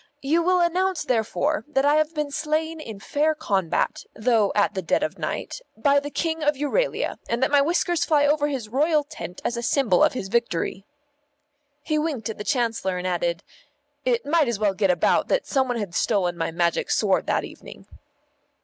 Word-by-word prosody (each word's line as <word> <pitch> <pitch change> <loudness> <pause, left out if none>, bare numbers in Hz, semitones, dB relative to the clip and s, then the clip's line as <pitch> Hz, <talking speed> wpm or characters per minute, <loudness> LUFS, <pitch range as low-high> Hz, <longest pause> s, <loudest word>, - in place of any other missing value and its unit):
You 315 +5 +2
will 365 +1 +2
announce 365 +1 +1
therefore 255 +6 0
that 275 -2 +1
I 290 - +4
have 310 +1 0
been 300 -1 -2
slain 315 +2 -2
in 220 -9 -8
fair 305 +8 0
combat, 195 - -1
though 220 -3 +2
at 205 0 +2
the 190 - -3
dead 175 - 0
of 310 - -3
night, - - -4 0.2
by 280 +5 +3
the 290 +1 -6
King 320 +1 -2
of 295 0 +2
Euralia, 295 - -1
and 235 +2 0
that 265 - +1
my 285 -1 +5
whiskers 340 +2 +1
fly 300 -4 +3
over 295 0 +2
his 265 -7 -4
royal 300 +6 +2
tent 180 - -9
as 240 - -1
a - - -2
symbol 235 -6 +2
of - - +3
his 200 -6 -4
victory." 195 -3 -1 1.0
He 310 0 0
winked 285 -9 -2
at 215 - -11
the - - -3
Chancellor 225 -7 -1
and 180 - -5
added, 175 0 -1 0.6
"It 250 -1 0
might 310 0 +2
as 235 -3 -1
well 205 -1 +1
get 195 0 +1
about 175 -2 +2
that - - +1
some 265 -2 +1
one 245 -1 -1
had 205 -6 -4
stolen 175 0 +1
my 165 - -2
Magic 170 0 0
Sword - - +1
that - - +1
evening." - - -11
270 Hz, 195 wpm, -24 LUFS, 205-305 Hz, 1.0 s, my